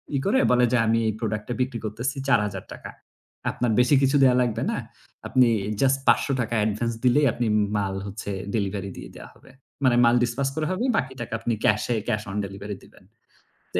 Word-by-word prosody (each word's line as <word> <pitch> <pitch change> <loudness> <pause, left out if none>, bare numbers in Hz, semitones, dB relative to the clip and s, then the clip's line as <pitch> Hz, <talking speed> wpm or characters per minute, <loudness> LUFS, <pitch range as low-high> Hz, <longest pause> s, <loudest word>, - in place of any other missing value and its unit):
ই - - +2
করে 240 +7 +3
বলে 125 0 +4
যে - - +4
আমি 115 +1 +3
এই 110 - 0
product-টা 110 +1 -3
বিক্রি 125 -2 -2
করতেছি 120 +5 -3
৳৪,০০০। 105 -7 -1 0.6
আপনার 120 -2 -1
বেশি 125 +4 +4
কিছু 135 +2 +2
দেওয়া 125 -1 +5
লাগবে 120 -2 -1
না। - - -2 0.5
আপনি 130 -1 +4 0.3
just 135 0 +3
৳৫০০ 125 -4 +2
advance 110 +2 -1
দিলেই 135 +4 +4
আপনি 120 -1 -1 0.3
মাল 100 -1 -2
হচ্ছে 100 +1 -6 0.2
delivery 100 -2 -2
দিয়ে - - -9
দেয়া - - -11
হবে। - - -20 0.3
মানে 125 -2 +4
মাল 120 +1 +4
dispatch 125 +3 -1
করা 155 -1 -1
হবে 185 +7 -1
বাকি 130 0 -2
টাকা 120 - -6
আপনি 115 +1 -1
cash-এ 120 - +2
cash 105 0 -1
on 100 - -4
delivery 100 +1 -7
দিবেন। - - -20 0.7
তো - - +3
120 Hz, 185 wpm, -24 LUFS, 105-130 Hz, 0.7 s, দেওয়া